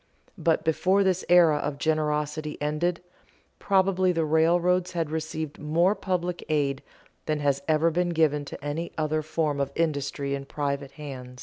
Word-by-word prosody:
But 165 -2 +2
before 185 +5 +3
this 185 -1 +1
era 170 -4 +6
of 145 -1 -3
generosity 150 0 -1
ended, 165 +4 -1 0.6
probably 190 -1 +2
the 165 -2 0
railroads 175 +3 +2
had 165 -3 -2
received 155 -1 -4
more 170 +6 +2
public 180 -3 -2
aid 140 -3 0 0.5
than 155 -1 0
has 140 -1 +1
ever 160 +1 +3
been 175 +2 0
given 155 -3 +2
to 140 - -9
any 155 +4 -3
other 155 0 0
form 155 -2 -1
of 140 -1 -1
industry 140 -3 -1
in 140 0 -4
private 140 -1 -3
hands. 130 -4 -9
155 Hz, 150 wpm, -26 LUFS, 145-175 Hz, 0.6 s, era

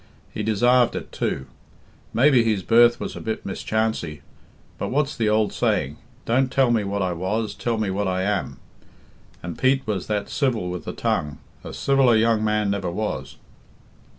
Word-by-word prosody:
He - - -3
desarved 120 +3 +3
it, - - -6
too. 65 - -2 0.7
Maybe 130 -1 +4
his 110 -4 0
birth 120 +2 +5
was - - -5
a - - -7
bit 110 -1 -4
mischancy, 100 -7 -2 0.6
but - - -2
what's 145 +2 0
the 110 -2 +1
ould 110 0 +2
saying, 70 +3 0 0.3
'Don't 130 +2 +1
tell 130 -3 +3
me 115 -3 +2
what 100 0 -2
I 90 -1 -1
was, 105 +5 -2
tell 115 -2 -2
me 105 -3 -1
what 100 +1 -1
I 95 0 0
am.' 100 -1 -1 0.9
And 85 -1 -6
Pete 130 +1 +2
was 100 -4 -3
that 105 -1 -1
civil 115 -11 -1
with 90 - -6
the - - -4
tongue 75 -1 -1 0.3
a - - -7
civiller 135 -4 +3
young 110 0 +3
man 105 -1 +1
never 100 -3 -2
was." 85 -8 -4
110 Hz, 175 wpm, -23 LUFS, 95-120 Hz, 0.9 s, birth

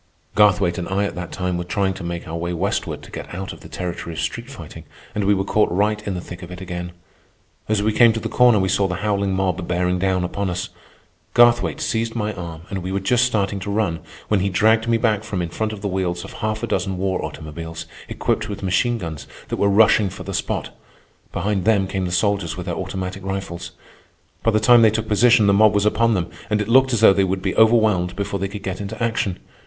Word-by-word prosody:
Garthwaite 100 -4 +3
and 90 - -4
I 100 +1 +1
at - - -3
that 90 -1 -6
time 90 -1 -2
were - - -2
trying 95 +2 0
to 95 - -9
make 85 0 -5
our 80 - -5
way 85 +1 -3
westward 95 +4 -2
to - - -13
get - - -7
out 95 +1 -5
of - - -13
the - - -13
territory 85 -2 -5
of - - -5
street 120 +10 -3
fighting, 85 - -10 0.3
and 105 - -1
we 100 +1 +4
were 95 - 0
caught 105 +1 +2
right 105 +3 +1
in 100 - -2
the 90 - -4
thick 90 0 -9
of 90 - -9
it 90 0 -8
again. 90 -1 -6 0.8
As 105 -1 +1
we 110 0 +1
came 120 0 +6
to 115 - -2
the - - -4
corner 125 -3 +5
we 95 -1 +1
saw 100 +1 +2
the 90 - -3
howling 100 -2 0
mob 95 -2 -1
bearing 90 +1 0
down 95 -1 +1
upon 95 +2 -2
us. 90 0 -3 0.7
Garthwaite 120 0 +4
seized 115 0 -1
my 105 -2 -1
arm 85 -3 -7
and 100 - -2
we 90 +2 -4
were 100 - 0
just 120 +6 +3
starting 100 -4 0
to 95 - -6
run, 100 -6 0 0.3
when 105 - +2
he 100 +2 0
dragged 110 +4 +3
me 115 0 +3
back 110 -3 +1
from 105 -4 -4
in 85 -1 -2
front 110 +6 -2
of 105 -2 -7
the - - 0
wheels 90 -2 -2
of - - -10
half 110 0 -2
a - - -1
dozen 95 -2 -1
war 95 0 -1
automobiles, 80 +1 -7 0.2
equipped - - -1
with 100 -1 -6
machine 120 +6 +1
guns, 80 - -6 0.2
that - - -2
were 100 - +2
rushing 105 0 +5
for - - -9
the - - -6
spot. - - -3 0.6
Behind 100 -2 -1
them 105 -2 +3
came 95 -1 -2
the 90 - -3
soldiers 100 -2 0
with 90 - -5
their 90 - -2
automatic 95 +1 -5
rifles. 95 -3 -4 0.7
By - - +2
the 110 -1 +2
time 120 +2 +6
they 110 - +7
took 110 +1 -2
position, 115 +1 +5
the 100 - +4
mob 105 +1 +5
was 100 0 +2
upon 115 +1 +3
them, 90 -2 -2 0.2
and 105 -1 +1
it 105 - -2
looked 130 +2 +5
as 115 -3 +1
though 110 - +8
they 95 - +2
would 95 0 -1
be 95 - -1
overwhelmed 110 -6 +3
before 100 0 -3
they 100 - -1
could 100 0 -8
get 95 0 -4
into 100 - -6
action. 110 -5 -1
100 Hz, 245 wpm, -21 LUFS, 90-110 Hz, 0.8 s, though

